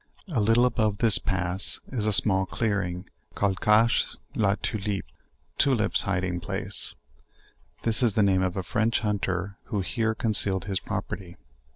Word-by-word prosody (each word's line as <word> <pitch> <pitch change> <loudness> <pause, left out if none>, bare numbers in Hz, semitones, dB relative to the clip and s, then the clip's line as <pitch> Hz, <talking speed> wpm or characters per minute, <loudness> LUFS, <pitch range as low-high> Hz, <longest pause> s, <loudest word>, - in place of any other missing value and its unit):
A 140 -9 0
littie 115 +4 +4
above 110 -4 +1
this 110 -1 +6
pass 90 +1 -1
is. 110 -5 -2
a - - +2
small 95 -1 +3
clearing, 95 -5 -2 0.3
called 95 -2 0
''Cache 110 +2 +3 0.2
la 100 -2 +2
Turlipe" 105 -2 -3 0.5
(Tulips 125 -6 +3
hiding 90 -3 -1
place;) 85 - -4 0.9
this 115 +2 +3
is 115 -5 +2
the 105 - +4
name 95 -2 +3
of 90 0 -1
a 95 - -2
French 110 +5 0
hunter 100 -2 -2
who 105 -5 -2
here 110 +4 -1
con 110 -1 -1
cealed 95 -3 +2
his 100 -2 -2
property. 90 -2 -6
100 Hz, 155 wpm, -26 LUFS, 95-110 Hz, 0.9 s, this